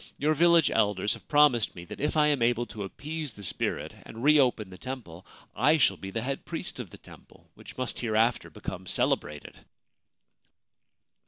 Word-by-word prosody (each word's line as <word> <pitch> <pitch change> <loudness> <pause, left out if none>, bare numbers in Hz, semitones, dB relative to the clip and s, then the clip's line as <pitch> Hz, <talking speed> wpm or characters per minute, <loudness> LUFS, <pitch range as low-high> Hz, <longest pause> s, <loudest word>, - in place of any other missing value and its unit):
Your 150 +2 +2
village 170 0 +4
elders 105 -2 +1
have - - -12
promised 145 -7 +3
me 85 - -9
that - - -9
if 150 +2 -1
I 150 - +5
am 145 -4 +1
able 120 0 +2
to 105 -1 -9
appease 150 +7 -5
the 100 - -11
spirit 85 - -1
and 115 +2 -10
reopen 130 -9 +3
the 90 - -10
temple 115 -10 -8 0.3
I 155 +2 +4
shall 150 - +3
be 95 - -8
the 115 +3 -3
head 135 +1 -3
priest 165 -4 -4
of 115 -7 -6
the - - -13
temple, - - -18
which - - -13
must 130 -1 0
hereafter 115 0 +1
become - - -8
celebrated.' 75 -1 -1
120 Hz, 175 wpm, -28 LUFS, 105-150 Hz, 0.3 s, I